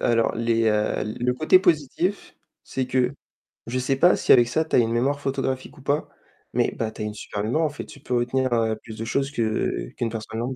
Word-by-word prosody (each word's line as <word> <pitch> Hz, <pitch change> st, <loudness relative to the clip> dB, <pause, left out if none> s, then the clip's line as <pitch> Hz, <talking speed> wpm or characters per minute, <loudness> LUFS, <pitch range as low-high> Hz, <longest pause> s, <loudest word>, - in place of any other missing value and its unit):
alors 115 Hz, -1 st, +2 dB
les, 115 Hz, -1 st, +1 dB
heu 105 Hz, 0 st, 0 dB, 0.2 s
le 125 Hz, +1 st, +2 dB
côté 155 Hz, +7 st, +5 dB
positif, 175 Hz, +2 st, 0 dB, 0.3 s
c'est 130 Hz, -1 st, -3 dB
que 125 Hz, 0 st, +1 dB, 0.6 s
je 130 Hz, +2 st, -1 dB
sais 130 Hz, +2 st, 0 dB
pas 175 Hz, +7 st, +5 dB
si -, -, +1 dB
avec 120 Hz, -2 st, +7 dB
ça, 160 Hz, +6 st, 0 dB
tu -, -, -1 dB
as -, -, +6 dB
une 115 Hz, -1 st, +2 dB
mémoire 135 Hz, +5 st, +1 dB
photographique 130 Hz, -1 st, -3 dB
ou -, -, -13 dB
pas, 145 Hz, +3 st, -1 dB, 0.4 s
mais -, -, +2 dB
bah 110 Hz, -1 st, -2 dB
tu 110 Hz, -, -9 dB
as -, -, -1 dB
une 105 Hz, -, -4 dB
super 105 Hz, 0 st, -5 dB
en 160 Hz, 0 st, +2 dB
fait, 145 Hz, -, -7 dB
tu -, -, -13 dB
peux 125 Hz, -2 st, -3 dB
retenir 125 Hz, +1 st, 0 dB, 0.3 s
plus 110 Hz, -1 st, -9 dB
de 115 Hz, -, -4 dB
choses 135 Hz, +4 st, -1 dB
que 110 Hz, -6 st, -1 dB
qu'une 115 Hz, -, -1 dB
personne. 110 Hz, 0 st, -5 dB
125 Hz, 215 wpm, -24 LUFS, 115-140 Hz, 0.6 s, avec